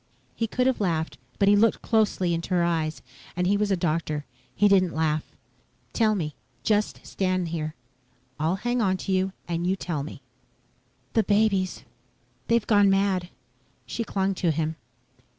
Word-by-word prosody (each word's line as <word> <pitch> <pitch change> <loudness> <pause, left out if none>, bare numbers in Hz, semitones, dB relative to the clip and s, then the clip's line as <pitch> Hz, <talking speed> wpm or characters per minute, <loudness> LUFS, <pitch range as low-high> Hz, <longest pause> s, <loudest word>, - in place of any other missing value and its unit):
He 225 - -1
could 250 +3 0
have 260 -4 +1
laughed, 165 -4 -1 0.2
but 200 - +3
he 200 - +7
had 205 - +5
looked 230 - +3
closely 205 -6 +2
into 170 +2 -1
her 175 - +3
eyes 160 -2 -1 0.3
and 180 +1 0
he 195 +3 +3
was 210 0 +1
a 195 - +2
doctor. 155 -3 -1 0.3
He 205 - +4
didn't 185 -3 +3
laugh. 155 -1 +1 0.7
"Tell 220 -2 +3
me. 155 -6 -2 0.3
Just 210 -1 0
stand 185 -2 -1
here. 155 -1 -3 0.6
I'll 160 +4 +1
hang 240 +4 -1
onto 190 -1 0
you 190 0 +1 0.2
and 170 0 -1
you 190 - +2
tell 170 -6 -3
me." 150 - -8 0.9
"The 225 - +4
babies 200 -3 +1 0.6
they've 230 -2 +2
gone 205 -2 +5
mad." 195 -2 +1 0.6
She 235 - -3
clung 195 -2 0
to 175 -2 0
him. 160 0 0
185 Hz, 165 wpm, -26 LUFS, 165-205 Hz, 0.9 s, he